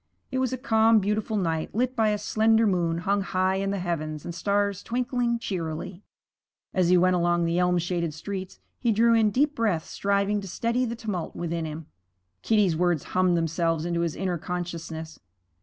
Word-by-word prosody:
It 260 - -1
was 260 -2 0
a 260 - -2
calm, 225 -3 +4
beautiful 210 +2 0
night, 165 -3 -2
lit 250 +2 0
by 220 -2 +3
a 210 - +1
slender 220 +2 +3
moon 175 -4 +1
hung 200 0 +2
high 190 0 0
in 195 0 -1
the 200 - -1
heavens 155 -4 -3
and 170 - -5
stars 200 +2 0
twinkling 245 -1 -1
cheerily. 175 -2 -4 0.7
As 180 -2 +2
he 180 - +6
went 185 +1 +4
along 175 -1 +2
the 170 +1 +1
elm 180 0 +3
shaded 170 -1 -1
streets, 190 +4 -6 0.2
he 235 - +2
drew 230 +2 +4
in 225 -2 +4
deep 285 +7 +1
breaths, 210 - -1
striving 200 +1 0
to 195 - -8
steady 235 +7 0
the 230 -1 -3
tumult 210 -7 -4
within 170 -1 -3
him. 155 +1 -6 0.6
Kitty's 205 - +2
words 175 -2 +1
hummed 185 -1 +3
themselves 165 0 0
into 170 -1 -1
his 170 -2 -1
inner 180 -3 -2
consciousness. 165 -2 -5
185 Hz, 185 wpm, -26 LUFS, 170-220 Hz, 0.7 s, he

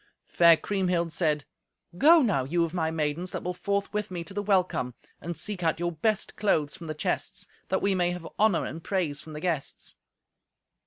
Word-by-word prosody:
Fair 170 -1 +6
Kriemhild 180 -4 0
said, 150 -4 0 0.5
"Go 315 - +7
now, 195 - +2
you 170 +6 +1
of 165 0 -3
my 160 -3 0
maidens 160 +3 -2
that - - -4
will 180 - -2
forth 200 +3 -2
with 210 0 -2
me 175 -2 -4
to 195 - -9
the 205 - -1
welcome, 185 - +1 0.2
and 170 +2 -5
seek 205 -4 -4
out 165 -1 +1
your 175 0 0
best 200 +6 -1
clothes 155 -8 +1
from 165 - -9
the 155 - -4
chests, - - -2 0.2
that - - 0
we 200 0 +3
may 175 -2 +2
have 175 -2 -5
honour 215 -5 +3
and 165 +1 -6
praise 165 -7 -1
from 155 - -10
the 150 - -5
guests." 160 -4 -3
175 Hz, 200 wpm, -27 LUFS, 160-195 Hz, 0.5 s, Go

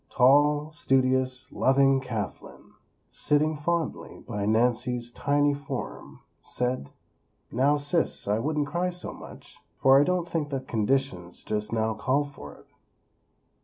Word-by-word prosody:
Tall, 145 +4 +4
studious, 130 -3 +1
loving 135 0 +3
Kathlyn, 115 -5 -6 0.4
sitting 155 +1 +1
fondly 165 +1 -3
by 105 -4 -3
Nancy's 120 +2 0
tiny 145 +3 +1
form, 140 0 -7 0.2
said; 125 - -3 0.6
"Now, 140 +4 +2
sis; 145 - 0
I 105 +2 +1
wouldn't 150 +3 -1
cry 175 +5 -1
so 180 0 -5
much, - - -13 0.2
for 135 +1 +6
I - - +5
don't 180 +1 0
think 160 -4 -2
that 135 -2 -4
conditions, 110 -6 -1
just 105 0 -3
now, 110 -1 0
call 130 +7 0
for 75 - -11
it." - - -19
135 Hz, 130 wpm, -27 LUFS, 120-145 Hz, 0.6 s, for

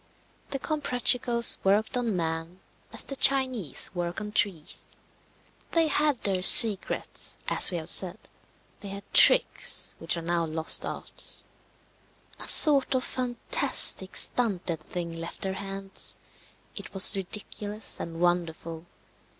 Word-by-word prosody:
The 275 - -4
Comprachicos 250 -5 0
worked 205 +5 0
on 235 -5 -2
man 165 +1 -5 0.3
as - - -4
the 275 - -6
Chinese 255 - 0
work 175 +1 -5
on 210 -1 -8
trees. 185 -7 -4 0.9
They 330 -2 +1
had 295 -4 0
their 190 -2 -2
secrets, 205 +1 +3
as - - +3
we 180 - -4
have 160 -1 -8
said; 185 -1 -1 0.6
they 205 - -11
had 200 +1 -9
tricks - - +4
which 165 +1 -2
are 170 - -7
now 170 0 -2
lost 160 0 0
arts. - - -6 1.0
A - - -5
sort 280 -3 +7
of 255 - -1
fantastic 250 - +1
stunted 185 -9 0
thing 170 +1 -8
left 165 0 -9
their 190 -1 -4
hands; 195 0 -4 0.6
it - - -10
was 195 - +6
ridiculous 205 +2 -5
and 165 0 -8
wonderful. 170 -1 -3
195 Hz, 125 wpm, -25 LUFS, 170-245 Hz, 1.0 s, sort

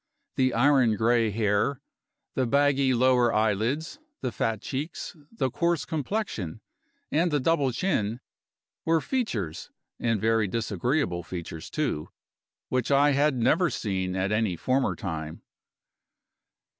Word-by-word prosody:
The 130 -2 +2
iron 130 -3 +4
gray 115 +1 +2
hair, 105 +5 +1 0.5
the 130 -2 0
baggy 140 0 +3
lower 125 -1 +4
eyelids, 110 - 0 0.2
the 125 - -2
fat 110 +1 -1
cheeks, 145 +11 -5 0.2
the 170 - -1
coarse 170 +1 0
complexion, 150 - -3 0.5
and 165 +4 +2
the 150 -2 +1
double 140 -2 +2
chin, 120 - -1 0.6
were 165 0 +3
features, 120 - -3 0.3
and 115 -2 +1
very 110 0 +2
disagreeable 110 - -1
features, 85 -2 -7
too, 135 - -2 0.6
which 130 -2 -1
I 140 +1 +5
had 140 0 +2
never 150 +9 +3
seen 95 -7 -2
at 95 +2 0
any 105 -4 +1
former 130 +9 0
time. 80 -6 -5
125 Hz, 120 wpm, -27 LUFS, 105-145 Hz, 0.6 s, I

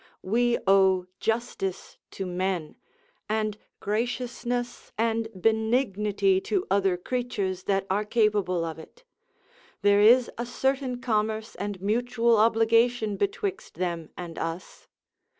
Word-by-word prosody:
We 240 +4 +2
owe 190 -1 +4
justice 225 -5 -3
to 195 - -5
men, 180 -3 -2 0.5
and 215 -1 0 0.2
graciousness 245 +2 -3
and 225 0 0
benignity 220 - +2
to 400 -3 0
other 195 -2 +2
creatures 200 -3 -3
that 195 -1 +1
are 200 +2 0
capable 210 -6 +1
of 160 -1 -6
it; - - -14 0.8
there 205 0 +5
is 240 +3 +6
a 240 - -1
certain 265 0 -1
commerce 220 -1 -1
and 205 -1 -5
mutual 235 +2 +2
obligation 225 0 +3
betwixt 395 - -3
them 170 -2 -3
and 175 -2 -7
us. 165 +3 -6
220 Hz, 115 wpm, -27 LUFS, 195-240 Hz, 0.8 s, is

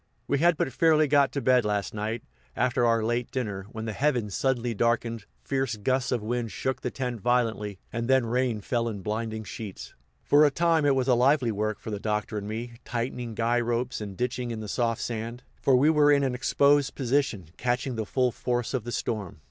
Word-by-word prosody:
We 140 - +1
had 170 +1 +4
but 135 - -1
fairly 155 0 +4
got 140 -1 +4
to 140 - -1
bed 125 0 +4
last 105 -1 -1
night, 110 +2 -3 0.3
after 120 -1 +2
our 115 -1 +2
late 120 +2 -1
dinner, 105 -7 -4
when 110 -1 -6
the 110 - -3
heavens 120 -5 0
suddenly 125 -1 0
darkened, 115 -1 0 0.2
fierce 135 -4 -1
gusts 130 +5 0
of 120 -4 0
wind 120 0 -2
shook 130 0 -2
the 125 - -2
tent 125 -3 -4
violently, 115 -4 0 0.2
and 115 0 -2
then 130 -2 +4
rain 120 -2 0
fell 115 +2 -1
in 100 -4 -6
blinding 110 0 -3
sheets. 105 -1 -8 0.3
For 145 +1 +5
a 150 - +6
time 165 0 +2
it 140 - +4
was 130 -1 0
lively 125 0 +3
work 110 0 -1
for 110 - -7
the 105 - -3
Doctor 105 0 -2
and 100 - -7
me, 115 +2 -5
tightening 120 -1 -4
guy 115 +2 +1
ropes 120 +2 -1
and 100 -3 -6
ditching 125 0 -2
in 115 -2 -4
the 110 - -6
soft 115 +2 -1
sand, 115 +1 -4 0.2
for 135 - +4
we 145 +5 +5
were 150 -2 +5
in 140 -1 +4
an 130 -2 0
exposed 140 +2 +2
position, 125 - 0
catching 125 +1 -1
the 110 -2 -3
full 125 0 +1
force 120 +1 -2
of 125 -4 -2
the 120 - -4
storm. 105 -9 -3
120 Hz, 210 wpm, -27 LUFS, 110-130 Hz, 0.3 s, a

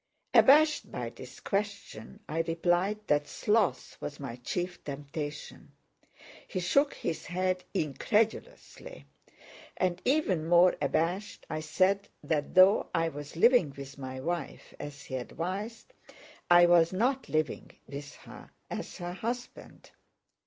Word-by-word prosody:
Abashed 300 +3 +5
by - - -4
this - - -12
question, 205 +1 -4
I 160 - -3
replied 175 +5 0
that 145 -3 +1
sloth 210 -2 0
was 145 - -6
my 135 -4 -6
chief 175 +8 -4
temptation. 145 +1 -7 0.7
He - - -3
shook 275 +11 +2
his 160 - -4
head 185 +1 -1
incredulously; 220 - -2 0.7
and 180 -1 0
even 210 - +1
more 175 +1 +6
abashed, 175 +8 -1
I 155 - -2
said 190 +6 +1 0.2
that 150 -3 -2
though 185 +3 +6
I 165 0 +2
was 145 0 -9
living 180 - +4
with 140 0 -9
my 130 -1 -6
wife 165 0 -4
as 145 -1 -8
he 130 -2 -4
advised, 195 - -5 0.6
I 175 0 +8
was 170 -1 +5
not 255 +8 0
living 155 0 -1 0.2
with 140 0 -8
her - - -13 0.2
as - - -5
her 175 0 -5
husband. 240 +5 -6
175 Hz, 125 wpm, -30 LUFS, 150-205 Hz, 0.7 s, I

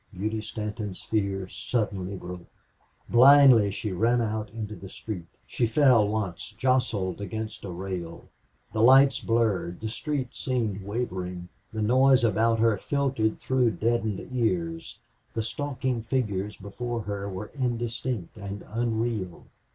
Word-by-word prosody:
Beauty 110 +3 -2
Stanton's 105 -2 -5
fear 100 -3 -1
suddenly 100 -3 -2
broke. 90 -1 -8 0.6
Blindly 130 -3 +7
she 105 +2 -4
ran 115 +6 +2
out 110 -2 -2
into 105 0 -6
the 95 - -10
street. 95 -5 -7 0.2
She 120 - 0
fell 120 -4 +5
once 105 -1 -3
jostled 115 -7 +1
against 110 +1 -5
a 100 - -5
rail. 90 -2 -6 0.5
The 110 - 0
lights 135 +3 +7
blurred; 110 -6 0
the 110 - -4
street 135 +1 -3
seemed 115 -7 -2
wavering; 90 -5 -4 0.2
the 110 -1 -2
noise 130 +3 +5
about 115 +1 +3
her 115 -2 +3
filtered 135 -4 0
through 125 -3 +2
deadened 110 -3 0
ears; 85 -9 -1 0.4
the 110 - 0
stalking 130 +1 -2
figures 105 -5 -2
before 120 +4 -4
her 100 -1 -4
were 95 +2 -6
indistinct 120 - -3
and 100 0 -6
unreal. 115 -5 -2
110 Hz, 130 wpm, -27 LUFS, 100-120 Hz, 0.6 s, Blindly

